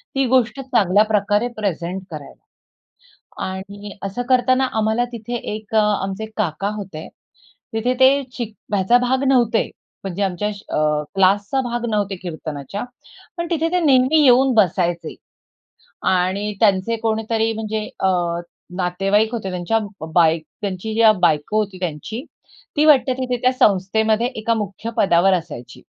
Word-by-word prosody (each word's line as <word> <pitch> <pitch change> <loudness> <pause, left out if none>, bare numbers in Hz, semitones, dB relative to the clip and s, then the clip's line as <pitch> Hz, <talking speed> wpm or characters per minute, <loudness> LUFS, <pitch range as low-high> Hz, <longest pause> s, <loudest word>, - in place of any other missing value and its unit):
ती 270 - +2
गोष्ट 255 +1 +2
चांगल्या 210 -6 +3
प्रकारे 210 +1 +1
प्रेझेंट 185 -2 -3
करायला 150 -2 -10 1.0
आणि 200 +2 -7
असं 195 +5 -3
करताना 255 +1 +3
आम्हाला 220 +3 +1
तिथे 235 +1 -5 0.2
एक 215 0 -6
आमचे 210 -1 +1
काका 195 0 -1
होते, 190 -7 -7 0.7
तिथे 235 +3 0
ते 270 +2 +5 0.2
शिक 225 -3 -4 0.2
ह्याचा 200 +5 +4
भाग 255 +2 0
नव्हते, 240 -4 +2 0.3
म्हणजे 195 +1 -3
आमच्या 190 +1 -1
अ, 150 -7 -1
क्लासचा 200 +7 +2
भाग 240 -1 -3
नव्हते 205 -2 -1
कीर्तनाच्या. 160 - -6 0.5
पण 340 - -2
तिथे 330 -1 0
ते 360 - +2
नेहमी 280 0 +4
येऊन 260 0 +5
बसायचे 175 -4 +1 1.0
आणि 190 +3 0
त्यांचे 205 +1 +2
कोणीतरी 225 0 0
म्हणजे 215 -1 -3
अ, 190 - +2 0.7
नातेवाईक 195 +5 +1
होते 210 -5 -3
त्यांच्या 180 +5 0
ब 195 -6 -8
बाय 165 -1 +4 0.2
त्यांची 200 +2 -4
ज्या 225 -1 +6
बायको 160 +1 +1
होती 200 -3 -3
त्यांची, 180 - -5 0.5
ती 300 0 +3
वाटते 275 -3 +5
तिथे 250 -1 -1
त्या 255 - +4
संस्थेमध्ये 220 0 +2
एका 220 +1 0
मुख्य 215 0 -4
पदावर 190 -2 +4
असायची. 155 -9 -5
210 Hz, 135 wpm, -20 LUFS, 190-240 Hz, 1.0 s, ज्या